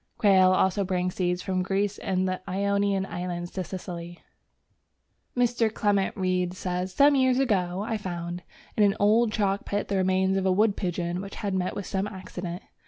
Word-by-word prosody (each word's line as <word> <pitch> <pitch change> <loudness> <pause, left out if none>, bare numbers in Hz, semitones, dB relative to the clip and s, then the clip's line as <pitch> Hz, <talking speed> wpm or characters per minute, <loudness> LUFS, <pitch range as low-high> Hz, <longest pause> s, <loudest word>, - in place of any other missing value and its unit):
Quail 190 -3 +5
also 190 +2 +2
bring 180 -1 -1
seeds 180 -1 -1
from 185 -1 -1
Greece 195 +2 -1
and 185 0 0
the 185 0 -2
Ionian 200 0 +1
Islands 175 -1 -5
to 185 - -3
Sicily. 175 -1 -7 1.1
Mr. 240 -2 +2
Clement 205 -2 0
Reid 185 -1 0
says: 180 0 -3
"Some 285 +9 +5
years 260 -2 +3
ago 195 -7 +1
I 225 -2 -1
found... 175 -3 -5 0.3
in - - +1
an 200 -1 +3
old 215 +3 +4
chalk 200 -2 0
pit 205 0 -3
the 200 - +1
remains 190 +1 +2
of 190 - -1
a - - +4
wood 205 +2 +3
pigeon 175 0 -2
which 200 0 -8
had 200 -2 -3
met 185 -1 -1
with 200 - -4
some 195 +1 -2
accident. 185 -3 -7
190 Hz, 175 wpm, -26 LUFS, 180-205 Hz, 1.1 s, Quail